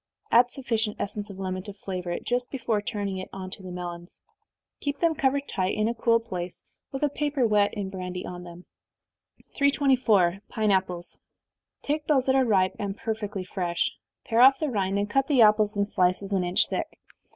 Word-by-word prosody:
Add 245 Hz, +1 st, +6 dB
sufficient 225 Hz, -5 st, -2 dB
essence 205 Hz, +1 st, -4 dB
of 195 Hz, -, -9 dB
lemon 185 Hz, -1 st, -3 dB
to 205 Hz, +1 st, -8 dB
flavor 185 Hz, -2 st, -5 dB
it, 175 Hz, -, -3 dB
just 245 Hz, +1 st, -1 dB
before 230 Hz, -5 st, -1 dB
turning 200 Hz, -2 st, -3 dB
it 185 Hz, -, -7 dB
on 185 Hz, -1 st, -7 dB
to 195 Hz, -, -8 dB
the 185 Hz, -, -8 dB
melons. 175 Hz, -1 st, -7 dB, 0.6 s
Keep 285 Hz, -1 st, -3 dB
them 335 Hz, -1 st, +3 dB
covered 280 Hz, -2 st, 0 dB
tight, 185 Hz, 0 st, -1 dB
in 215 Hz, 0 st, +2 dB
a 230 Hz, -, 0 dB
cool 230 Hz, 0 st, +3 dB
place, 180 Hz, -6 st, -5 dB, 0.3 s
with 270 Hz, +2 st, -4 dB
a -, -, +5 dB
paper 290 Hz, -2 st, 0 dB
wet 210 Hz, -2 st, +3 dB
in 200 Hz, -2 st, -4 dB
brandy 180 Hz, -1 st, -5 dB
on 175 Hz, 0 st, -7 dB
them. 175 Hz, 0 st, -11 dB, 0.9 s
324. 255 Hz, -, +3 dB
Pine 215 Hz, -2 st, +1 dB
Apples. 180 Hz, -2 st, -1 dB, 0.6 s
Take 300 Hz, +1 st, -2 dB
those 270 Hz, -4 st, +3 dB
that 265 Hz, -, +3 dB
are 265 Hz, -1 st, +4 dB
ripe, 190 Hz, -5 st, +2 dB
and 200 Hz, 0 st, -3 dB
perfectly 210 Hz, -4 st, -3 dB
fresh 175 Hz, -2 st, -1 dB, 0.3 s
pare 230 Hz, +1 st, +2 dB
off 270 Hz, +1 st, +7 dB
the 310 Hz, -, -1 dB
rind, 195 Hz, -3 st, 0 dB
and 205 Hz, 0 st, 0 dB
cut 270 Hz, +6 st, +1 dB
the 265 Hz, -6 st, +5 dB
apples 210 Hz, 0 st, +4 dB
in 200 Hz, -, +2 dB
slices 190 Hz, 0 st, +2 dB
an 190 Hz, -2 st, +2 dB
inch 180 Hz, +1 st, +2 dB
thick. -, -, -4 dB
205 Hz, 195 wpm, -26 LUFS, 185-245 Hz, 0.9 s, off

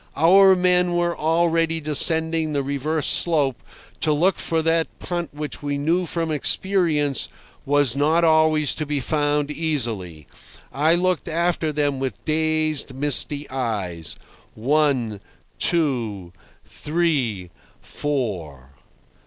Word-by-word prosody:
Our 190 Hz, +5 st, +6 dB
men 180 Hz, -1 st, +2 dB
were 175 Hz, 0 st, 0 dB
already 165 Hz, 0 st, +1 dB
descending 160 Hz, +1 st, +3 dB
the 140 Hz, -1 st, -1 dB
reverse 140 Hz, +3 st, -2 dB
slope 145 Hz, -, +1 dB, 0.4 s
to 155 Hz, -, +1 dB
look 175 Hz, +6 st, +1 dB
for 160 Hz, -1 st, -1 dB
that 165 Hz, 0 st, +1 dB
punt 175 Hz, -2 st, -5 dB
which 150 Hz, 0 st, -6 dB
we 145 Hz, -1 st, -3 dB
knew 170 Hz, +5 st, 0 dB
from 165 Hz, 0 st, -2 dB
experience 155 Hz, -3 st, +1 dB, 0.4 s
was 145 Hz, -3 st, +2 dB
not 155 Hz, +4 st, +2 dB
always 155 Hz, -2 st, +3 dB
to 155 Hz, -, -4 dB
be 145 Hz, -1 st, -1 dB
found 145 Hz, +1 st, -1 dB
easily. 115 Hz, -, -3 dB, 0.5 s
I 155 Hz, +4 st, +2 dB
looked 180 Hz, -2 st, -1 dB
after 170 Hz, -1 st, -1 dB
them 145 Hz, -2 st, -1 dB
with 135 Hz, -1 st, -5 dB
dazed, 155 Hz, -3 st, 0 dB
misty 145 Hz, +1 st, 0 dB
eyes. 100 Hz, -, -3 dB, 0.4 s
One, 130 Hz, -4 st, 0 dB, 0.4 s
two, 115 Hz, -, -1 dB, 0.3 s
three, 140 Hz, -, -2 dB, 0.3 s
four. 90 Hz, -, -5 dB
150 Hz, 115 wpm, -22 LUFS, 135-165 Hz, 0.5 s, Our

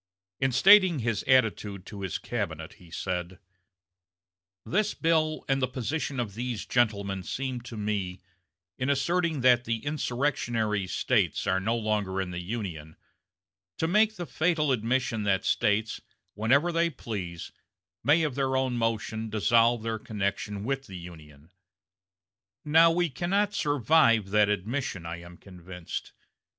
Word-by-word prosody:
In 135 Hz, 0 st, +1 dB
stating 185 Hz, -, +6 dB
his 115 Hz, -4 st, -1 dB
attitude 105 Hz, -6 st, +2 dB
to 100 Hz, -2 st, -9 dB
his 95 Hz, -2 st, -2 dB
cabinet 80 Hz, -9 st, -4 dB
he 90 Hz, -, -15 dB
said: 90 Hz, +2 st, -4 dB, 1.3 s
"This 210 Hz, +3 st, 0 dB
bill 160 Hz, -1 st, +1 dB
and 135 Hz, -1 st, +1 dB
the 130 Hz, -, +2 dB
position 135 Hz, +2 st, -3 dB
of 110 Hz, -5 st, -3 dB
these 120 Hz, 0 st, -4 dB
gentlemen 100 Hz, -5 st, 0 dB
seem 130 Hz, +7 st, -4 dB
to 115 Hz, -1 st, -9 dB
me, 100 Hz, -4 st, -3 dB, 0.6 s
in 130 Hz, -, -1 dB
asserting 160 Hz, +2 st, +1 dB
that 125 Hz, -1 st, +4 dB
the 115 Hz, +3 st, -3 dB
insurrectionary 120 Hz, -8 st, -1 dB
States -, -, 0 dB
are 95 Hz, -1 st, +1 dB
no 110 Hz, +5 st, 0 dB
longer 105 Hz, -4 st, -1 dB
in 95 Hz, -1 st, -3 dB
the 90 Hz, 0 st, -4 dB
Union, 90 Hz, -6 st, -5 dB, 0.8 s
to 160 Hz, -, 0 dB
make 215 Hz, +4 st, +3 dB
the 175 Hz, -, -5 dB
fatal 160 Hz, -3 st, +1 dB
admission 120 Hz, -1 st, 0 dB
that 95 Hz, -1 st, +1 dB
States, 110 Hz, 0 st, +1 dB, 0.3 s
whenever 135 Hz, -, +2 dB
they 170 Hz, 0 st, +2 dB
please, 95 Hz, -, -6 dB, 0.5 s
may 155 Hz, +3 st, +4 dB
of 150 Hz, -4 st, -1 dB
their 130 Hz, 0 st, 0 dB
own 130 Hz, -2 st, 0 dB
motion 110 Hz, -1 st, -2 dB
dissolve 115 Hz, +2 st, +3 dB
their 115 Hz, -1 st, -2 dB
connection 100 Hz, -1 st, -3 dB
with 135 Hz, +3 st, -3 dB
the 95 Hz, -3 st, -8 dB
Union. 80 Hz, -3 st, -13 dB, 1.1 s
Now 160 Hz, +3 st, +6 dB
we 175 Hz, +1 st, +1 dB
cannot 195 Hz, +8 st, 0 dB
survive 145 Hz, -, +3 dB
that 105 Hz, 0 st, +4 dB
admission, 105 Hz, -2 st, -2 dB
I 85 Hz, +1 st, -5 dB
am 85 Hz, 0 st, -12 dB
convinced. 90 Hz, -2 st, -8 dB
115 Hz, 140 wpm, -28 LUFS, 100-140 Hz, 1.3 s, stating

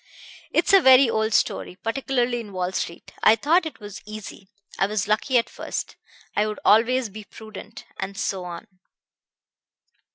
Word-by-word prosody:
It's -, -, +2 dB
a 390 Hz, -, +8 dB
very 260 Hz, -1 st, +7 dB
old 220 Hz, 0 st, 0 dB
story 180 Hz, -, 0 dB
particularly 240 Hz, +2 st, -1 dB
in 210 Hz, -4 st, -9 dB
Wall 180 Hz, 0 st, -2 dB
Street. 170 Hz, -2 st, -5 dB
I 220 Hz, -, +6 dB
thought 320 Hz, +7 st, +2 dB
it 315 Hz, -, -10 dB
was 205 Hz, -1 st, -9 dB
easy; 210 Hz, -2 st, -10 dB, 0.3 s
I 195 Hz, -, +3 dB
was 205 Hz, -1 st, -2 dB
lucky 230 Hz, +5 st, +2 dB
at 230 Hz, -, +2 dB
first; -, -, -6 dB, 0.4 s
I 210 Hz, +1 st, +2 dB
would 215 Hz, -, -5 dB
always 235 Hz, +3 st, +4 dB
be 215 Hz, +2 st, -9 dB
prudent 215 Hz, 0 st, -11 dB
and 195 Hz, +1 st, -5 dB
so 195 Hz, -4 st, -2 dB
on. 175 Hz, -1 st, -7 dB
215 Hz, 160 wpm, -24 LUFS, 200-245 Hz, 0.4 s, a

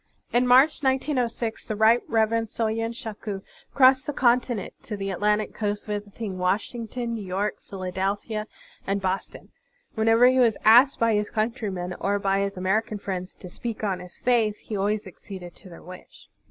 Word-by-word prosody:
In 245 Hz, +1 st, +3 dB
March, 265 Hz, +6 st, +5 dB
1906, 255 Hz, -4 st, -1 dB
the 215 Hz, -, -2 dB
Right 220 Hz, +3 st, +5 dB
Reverend 225 Hz, 0 st, +1 dB
Soyen 225 Hz, +1 st, -1 dB
Shaku 215 Hz, -4 st, -6 dB, 0.3 s
crossed 260 Hz, -1 st, +5 dB
the 295 Hz, -, -2 dB
continent 245 Hz, -4 st, +1 dB
to 210 Hz, -, -6 dB
the 195 Hz, 0 st, -3 dB
Atlantic 210 Hz, +3 st, 0 dB
coast, 210 Hz, -1 st, -3 dB
visiting 205 Hz, -1 st, -5 dB
Washington, 230 Hz, +5 st, -2 dB
New 220 Hz, -3 st, -4 dB
York, 195 Hz, +3 st, -2 dB
Phila 185 Hz, -2 st, -6 dB
delphia, 205 Hz, +3 st, -2 dB, 0.4 s
and 195 Hz, +1 st, 0 dB
Boston. 190 Hz, 0 st, -4 dB, 0.4 s
Whenever 225 Hz, +2 st, +4 dB
he 255 Hz, +1 st, +5 dB
was 235 Hz, -3 st, +4 dB
asked 245 Hz, +5 st, +7 dB
by 230 Hz, -1 st, +3 dB
his 210 Hz, 0 st, 0 dB
cotintrymen 215 Hz, -5 st, -2 dB
or 200 Hz, +1 st, +1 dB
by 195 Hz, -1 st, +1 dB
his 200 Hz, -1 st, -2 dB
American 210 Hz, +4 st, 0 dB
friends 190 Hz, -2 st, -5 dB
to 185 Hz, -, -11 dB
speak 225 Hz, +5 st, -6 dB
on 195 Hz, -3 st, 0 dB
his 180 Hz, 0 st, -12 dB
faith, 225 Hz, -4 st, +2 dB
he 215 Hz, -, -7 dB
always 205 Hz, +2 st, 0 dB
acceded 185 Hz, -1 st, -10 dB
to 190 Hz, -, -14 dB
their 170 Hz, -, -12 dB
wish. 180 Hz, +1 st, -13 dB
215 Hz, 165 wpm, -25 LUFS, 195-235 Hz, 0.4 s, asked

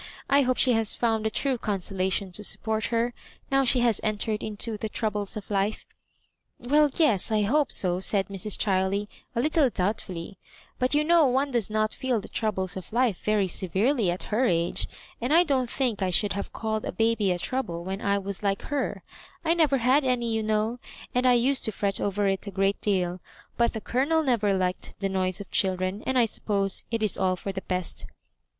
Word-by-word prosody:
I 280 Hz, +1 st, +6 dB
hope 255 Hz, -1 st, +1 dB
she 255 Hz, -, +5 dB
has 225 Hz, -2 st, +3 dB
found 225 Hz, -2 st, 0 dB
the -, -, +2 dB
true 260 Hz, +3 st, 0 dB
consolation 190 Hz, -1 st, -2 dB
to 210 Hz, +4 st, -1 dB
support 220 Hz, +1 st, 0 dB
her, 235 Hz, +1 st, 0 dB, 0.4 s
now 270 Hz, 0 st, +4 dB
she 250 Hz, -1 st, +3 dB
has 235 Hz, -4 st, +2 dB
entered 215 Hz, 0 st, -1 dB
into 215 Hz, +1 st, -4 dB
the 215 Hz, +1 st, -4 dB
troubles 210 Hz, -2 st, -2 dB
of 210 Hz, 0 st, -8 dB
life." 200 Hz, +2 st, -1 dB, 0.7 s
"Well, 295 Hz, +4 st, +3 dB
yes, 230 Hz, -, +3 dB
I 215 Hz, -1 st, +2 dB
hope 290 Hz, +8 st, +2 dB
so," 180 Hz, -1 st, +1 dB
said 195 Hz, +1 st, +2 dB
Mrs. 200 Hz, +1 st, -1 dB
Chiley, 195 Hz, +1 st, 0 dB, 0.3 s
a -, -, 0 dB
little 300 Hz, -1 st, +3 dB
doubtfully; 185 Hz, -3 st, -3 dB, 0.2 s
" -, -, -27 dB
but 255 Hz, +3 st, +2 dB
you 300 Hz, -, +3 dB
know 330 Hz, -1 st, +5 dB
one 270 Hz, +3 st, +1 dB
does 235 Hz, -5 st, 0 dB
not 215 Hz, 0 st, 0 dB
feel 260 Hz, -4 st, -1 dB
the -, -, -9 dB
troubles 190 Hz, -4 st, -2 dB
of 185 Hz, -3 st, -8 dB
life 235 Hz, -4 st, +1 dB
very 210 Hz, -2 st, +2 dB
severely 195 Hz, -, +1 dB
at 175 Hz, +1 st, -2 dB
her 245 Hz, +5 st, +3 dB
age; 170 Hz, -5 st, 0 dB, 0.3 s
and 245 Hz, +4 st, -1 dB
I 335 Hz, +3 st, +6 dB
don't 265 Hz, -7 st, 0 dB
think 240 Hz, -7 st, -1 dB
I 190 Hz, -, +1 dB
should 205 Hz, +3 st, +2 dB
have 200 Hz, -, -5 dB
called 220 Hz, -1 st, -3 dB
a -, -, -3 dB
baby 225 Hz, -3 st, +1 dB
a 180 Hz, -, +1 dB
trouble 175 Hz, -5 st, -3 dB
when 190 Hz, +3 st, -4 dB
I 200 Hz, -1 st, +1 dB
was 200 Hz, -1 st, -5 dB
like 195 Hz, -1 st, -1 dB
her, 285 Hz, -3 st, -3 dB, 0.4 s
I 325 Hz, -, +4 dB
never 310 Hz, -5 st, +3 dB
had 260 Hz, +4 st, +3 dB
any, 240 Hz, -3 st, 0 dB
you 220 Hz, -, 0 dB
know, 215 Hz, +2 st, 0 dB, 0.3 s
and 250 Hz, +1 st, +2 dB
I 250 Hz, -, +6 dB
used 255 Hz, +3 st, +2 dB
to 220 Hz, -, +1 dB
fret 200 Hz, -1 st, -2 dB
over 205 Hz, 0 st, 0 dB
it 195 Hz, 0 st, -1 dB
a -, -, -2 dB
great 195 Hz, +1 st, 0 dB
deal; 185 Hz, -3 st, 0 dB, 0.4 s
but 235 Hz, 0 st, +2 dB
the 220 Hz, -, -5 dB
Colonel 290 Hz, +9 st, +1 dB
never 230 Hz, -7 st, +2 dB
liked 185 Hz, -1 st, -2 dB
the 195 Hz, 0 st, -1 dB
noise 185 Hz, 0 st, 0 dB
of 205 Hz, -, -9 dB
children, 185 Hz, +1 st, 0 dB
and 260 Hz, -, +1 dB
I 240 Hz, -, +5 dB
suppose 200 Hz, -3 st, 0 dB
it 230 Hz, -2 st, -1 dB
is 210 Hz, -, +1 dB
all 185 Hz, -1 st, +2 dB
for 195 Hz, +2 st, -5 dB
the 190 Hz, 0 st, -5 dB
best." 180 Hz, -2 st, -4 dB
215 Hz, 210 wpm, -26 LUFS, 195-250 Hz, 0.7 s, I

